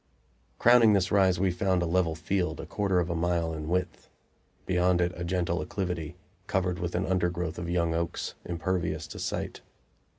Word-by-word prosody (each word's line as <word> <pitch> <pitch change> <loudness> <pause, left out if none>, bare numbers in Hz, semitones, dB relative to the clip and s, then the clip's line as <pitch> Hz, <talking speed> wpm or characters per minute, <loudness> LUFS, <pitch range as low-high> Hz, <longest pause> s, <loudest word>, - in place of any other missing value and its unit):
Crowning 120 -2 +6
this 95 -2 +2
rise 95 -3 +4
we 95 -1 +2
found 90 0 +1
a - - 0
level 85 -1 +1
field, 90 0 -1
a - - -5
quarter 100 -3 0
of 85 0 -1
a - - -1
mile 85 -1 0
in 75 -1 -5
width; 90 +1 -2 0.6
beyond 90 0 +2
it 90 0 +2
a 85 - -5
gentle 85 -1 0
acclivity, 90 -2 -3 0.3
covered 90 -1 0
with 85 -1 -3
an 95 - 0
undergrowth 90 -2 -1
of 85 0 -4
young 85 -1 +1
oaks, 85 +1 -2
impervious 85 -2 -2
to 80 - -9
sight. - - -3
90 Hz, 175 wpm, -28 LUFS, 85-95 Hz, 0.6 s, Crowning